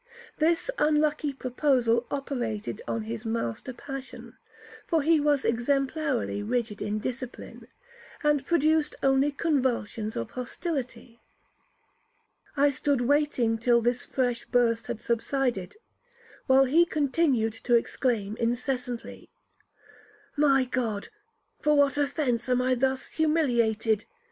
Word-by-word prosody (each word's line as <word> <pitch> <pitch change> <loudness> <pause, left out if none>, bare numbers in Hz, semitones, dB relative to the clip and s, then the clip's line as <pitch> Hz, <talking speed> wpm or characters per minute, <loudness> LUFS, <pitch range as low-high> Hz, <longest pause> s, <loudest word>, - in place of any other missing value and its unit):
This 335 +9 +2
unlucky 300 -1 +2
proposal 250 -3 +1
operated 240 -7 -3
on 225 - -2
his 225 +1 -5
master 225 - -3
passion, 270 +2 -9 0.5
(for 325 -4 +1
he 320 +1 +4
was 290 -2 +2
exemplarily 270 0 0
rigid 225 -1 -2
in 210 +1 -1
discipline), 250 +3 -6 0.6
and 295 -2 +2
produced 310 0 +2
only 270 +2 +3
convulsions 250 -8 -1
of 115 - -4
hostility. 250 -3 -5 1.4
I 285 +1 +4
stood 280 -1 0
waiting 255 -4 +1
till 235 +1 +4
this 240 +1 0
fresh 245 -3 -1
burst 230 -2 +1
had 220 - -5
subsided, 235 -4 -1 0.7
while 265 0 +6
he 310 +7 +5
continued 280 -7 +1
to 240 - +4
exclaim 230 -3 0
incessantly, 245 +1 -3 1.1
'My 275 -3 +4
God, 235 -5 -2 0.5
for 300 0 +3
what 285 0 +3
offence 280 -5 0
am 250 0 +3
I 255 +1 +2
thus 265 +1 -1
humiliated? 235 -9 +1
255 Hz, 110 wpm, -27 LUFS, 235-290 Hz, 1.4 s, while